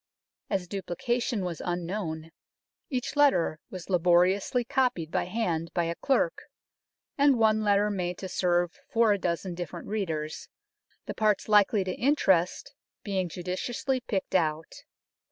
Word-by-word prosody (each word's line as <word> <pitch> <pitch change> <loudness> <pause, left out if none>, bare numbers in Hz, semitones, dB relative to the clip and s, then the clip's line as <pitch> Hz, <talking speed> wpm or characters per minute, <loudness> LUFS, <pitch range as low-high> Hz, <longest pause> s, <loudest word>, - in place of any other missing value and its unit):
As 185 -2 -1
duplica 195 +6 -2
tion 220 -6 -1
was 170 -2 -4
unknown, 175 -2 -3 0.6
each 255 0 -3
letter 275 - +3
was 185 -3 -8
laboriously 180 +6 +3
copied 250 - 0
by - - 0
hand 175 -5 -2
by 175 - +2
a 165 0 -1
clerk, 280 - 0 0.8
and 280 -2 +5
one 220 -1 +3
letter 205 0 +3
made 180 -3 -2
to 190 - -6
serve 175 -1 0
for 225 -2 +4
a 200 - -2
dozen 175 +1 -2
different 175 -3 -7
readers, 160 -8 -3 0.6
the - - -4
parts 215 -2 +1
likely 210 -1 +4
to 185 -1 -3
interest 190 - +1 0.3
being 190 -3 -1
judiciously 185 - -2
picked 205 -6 -3
out. 160 -3 0
190 Hz, 135 wpm, -28 LUFS, 175-220 Hz, 0.8 s, and